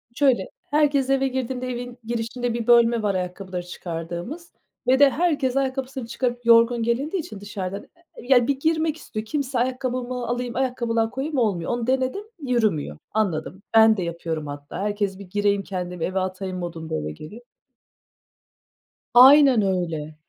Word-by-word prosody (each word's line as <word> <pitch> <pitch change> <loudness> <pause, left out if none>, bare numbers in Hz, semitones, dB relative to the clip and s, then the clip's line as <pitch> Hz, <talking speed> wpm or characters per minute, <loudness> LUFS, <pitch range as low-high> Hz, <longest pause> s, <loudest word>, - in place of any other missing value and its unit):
Şöyle, 255 -9 +2 0.2
herkes 290 -3 +2
eve 270 0 +2
girdiğinde 255 -1 -3
evin 245 0 -5
girişinde 235 +1 -3
bir 235 -1 -3
bölme 235 -1 +5
var 205 -2 0
ayakkabıları 180 0 -4
çıkardığımız 175 - -6 0.4
ve 260 +1 +4
de 285 -1 +8
herkes 285 -5 0
ayakkabısını 265 -2 -2
çıkarıp 240 0 -3
yorgun 230 0 +5
gelindiği 275 - -1
için 295 - -10
dışarıdan, 200 -1 -6 0.3
e - - -10
ya, 245 -2 +4
bir 275 -1 0
girmek 320 0 +1
istiyor. 215 -8 -6
Kimse 270 0 -2
ayakkabımı 250 -1 -2
alayım, 245 0 -3
ayakkabılığa 235 -3 0
koyayım 280 +3 -3
olmuyor. 200 -8 0
Onu 240 0 -2
denedim, 260 +9 0 0.2
yürümüyor, 215 - 0
anladım. 190 -3 -2
Ben 220 -1 +6
de 185 - -1
yapıyorum 165 -2 -4
hatta. 145 +2 -7
Herkes 205 -1 -2
bir 200 - -9
gireyim 205 0 +1
kendimi 180 -3 -4
eve 190 +1 -1
atayım 185 0 -4
modunda 165 - -5
eve 75 0 -3
geliyor. 155 - -10 1.7
Aynen 265 -1 +8
öyle. 165 -6 -2
235 Hz, 150 wpm, -23 LUFS, 190-260 Hz, 1.7 s, de